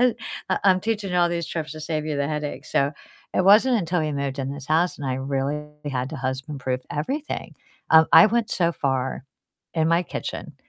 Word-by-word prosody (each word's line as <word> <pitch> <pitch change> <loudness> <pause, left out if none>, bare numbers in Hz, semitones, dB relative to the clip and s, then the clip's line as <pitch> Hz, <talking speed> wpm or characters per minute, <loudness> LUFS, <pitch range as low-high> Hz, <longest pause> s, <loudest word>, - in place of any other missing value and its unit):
U 250 -2 +4 0.5
I'm 185 -1 +5
teaching 210 -2 -2
you - - +1
all 175 0 +4
these 170 -1 -2
tricks 155 -4 -4
to 155 - -8
save 155 0 -3
you 150 - -2
the 140 0 0
headache. 150 -1 -4
So 140 +2 +1 0.4
it 185 - +2
wasn't 220 +6 +6
until 175 -1 0
we 155 -1 -1
moved 140 -1 -3
in 135 0 -2
this 140 -1 -7
house 165 +4 +2
and 140 - -5
I 130 - 0
really 140 +2 -2 0.2
had 130 -1 -2
to 160 - -5
husband-proof 130 0 -3
everything. 275 - -3 0.4
Um, 160 0 +7
I - - +10
went 235 +1 0
so 170 -2 +1
far 135 -3 -2 0.5
in 160 -2 +2
my 170 +1 +3
kitchen - - -6
155 Hz, 200 wpm, -24 LUFS, 140-180 Hz, 0.5 s, I